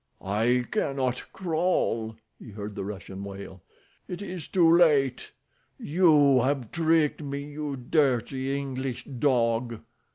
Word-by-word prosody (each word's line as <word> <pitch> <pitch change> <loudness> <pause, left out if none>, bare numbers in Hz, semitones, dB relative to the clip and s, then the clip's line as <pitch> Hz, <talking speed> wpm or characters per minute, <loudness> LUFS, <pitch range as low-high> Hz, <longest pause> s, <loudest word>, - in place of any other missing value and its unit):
"I 115 +6 +1
cannot 135 - -1
crawl," 160 -11 -1 0.2
he - - -11
heard 105 0 -7
the - - -5
Russian 95 -1 -7
wail. 100 -2 -9 0.5
"It 180 +2 -6
is 180 -5 -6
too 170 -3 +4
late. 140 -7 +3 0.5
You 150 -5 +4
have 130 -2 -1
tricked 160 -2 +2
me, 140 -1 -4
you 145 -1 -5
dirty 135 0 0
English 130 -2 -4
dog." 120 -4 0
135 Hz, 120 wpm, -27 LUFS, 115-150 Hz, 0.5 s, too